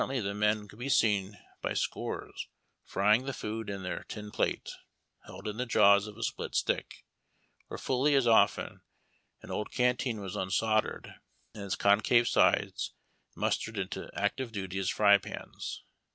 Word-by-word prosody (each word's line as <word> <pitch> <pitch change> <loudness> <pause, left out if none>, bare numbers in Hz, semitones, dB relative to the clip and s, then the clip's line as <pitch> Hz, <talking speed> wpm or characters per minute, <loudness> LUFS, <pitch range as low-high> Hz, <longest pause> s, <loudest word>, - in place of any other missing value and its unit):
}^ 130 -4 -2
the 100 0 -2
men 105 0 +1
could 105 - -15
be 130 +3 -3
seen 105 -5 +2 0.2
by - - -2
scores - - -3 0.4
frying 105 +6 +2
the 140 - -3
food 110 -2 -5
in 100 -1 -5
their 90 - -4
tin 105 -1 -7
plate, - - -1 0.6
held 95 +4 -9
in 105 0 -4
the 125 - -1
jaws 100 -2 +5
of 105 0 -10
a 115 - -5
split - - -3
stick, - - -1 0.6
or - - -5
fully 135 +3 +2
as 135 -3 +4
often 115 -1 +3 0.6
an - - -9
old 105 - -3
canteen 125 -2 0
was 100 0 -6
unsoldered 110 +3 0 0.4
and 105 -2 -7
its 95 - -1
concave 110 +4 +4
sides - - +2 0.4
mustered 115 -1 -1
into 95 -2 -4
active 130 -3 -1
duty 95 -3 -4
as 95 +1 0
fry 100 -1 +5
pans. - - -7
105 Hz, 160 wpm, -30 LUFS, 100-115 Hz, 0.6 s, jaws